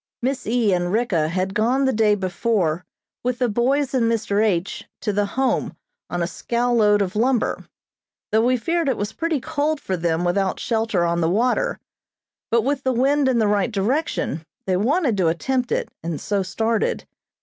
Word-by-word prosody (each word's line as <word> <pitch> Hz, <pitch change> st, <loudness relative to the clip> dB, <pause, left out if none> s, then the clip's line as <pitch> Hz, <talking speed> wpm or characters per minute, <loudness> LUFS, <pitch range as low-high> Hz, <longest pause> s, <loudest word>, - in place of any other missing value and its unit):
Miss 260 Hz, -2 st, -1 dB
E. 225 Hz, -3 st, +2 dB
and 175 Hz, 0 st, 0 dB
Ricka 205 Hz, -8 st, +1 dB
had 185 Hz, +3 st, -2 dB
gone 245 Hz, +6 st, +2 dB
the 265 Hz, -, +2 dB
day 215 Hz, -2 st, +3 dB
before 185 Hz, -3 st, 0 dB, 0.4 s
with 250 Hz, 0 st, -1 dB
the 250 Hz, -1 st, +1 dB
boys 255 Hz, +6 st, +1 dB
and 230 Hz, -3 st, +2 dB
Mr. 215 Hz, -2 st, +1 dB
H. 185 Hz, -4 st, -1 dB
to 210 Hz, -, -1 dB
the 205 Hz, 0 st, +1 dB
Home 265 Hz, -1 st, 0 dB, 0.3 s
on 175 Hz, -1 st, -1 dB
a -, -, +1 dB
scow 240 Hz, +7 st, -1 dB
load 210 Hz, -3 st, +4 dB
of 185 Hz, 0 st, -5 dB
lumber, 240 Hz, +2 st, 0 dB, 0.6 s
though 220 Hz, +1 st, +3 dB
we 250 Hz, +1 st, +3 dB
feared 330 Hz, +5 st, 0 dB
it 255 Hz, -, 0 dB
was 205 Hz, +2 st, -3 dB
pretty 330 Hz, -3 st, -1 dB
cold 305 Hz, +1 st, -1 dB
for 190 Hz, -, -2 dB
them 165 Hz, -1 st, 0 dB
without 190 Hz, +2 st, 0 dB
shelter 225 Hz, -6 st, 0 dB
on 170 Hz, 0 st, 0 dB
the 165 Hz, -, +2 dB
water; 250 Hz, -, +1 dB, 0.7 s
but 230 Hz, -1 st, +2 dB
with 275 Hz, +2 st, 0 dB
the 260 Hz, -, +1 dB
wind 270 Hz, +3 st, +2 dB
in 255 Hz, -, +2 dB
the 220 Hz, -, +3 dB
right 205 Hz, +1 st, +1 dB
direction, 210 Hz, -, -1 dB, 0.2 s
they 185 Hz, -, +1 dB
wanted 250 Hz, -, +1 dB
to 180 Hz, -3 st, +2 dB
attempt 245 Hz, +9 st, -1 dB
it, -, -, -1 dB
and 165 Hz, -2 st, -4 dB
so 200 Hz, -1 st, -1 dB
started. 220 Hz, +4 st, -1 dB
220 Hz, 185 wpm, -22 LUFS, 190-255 Hz, 0.7 s, load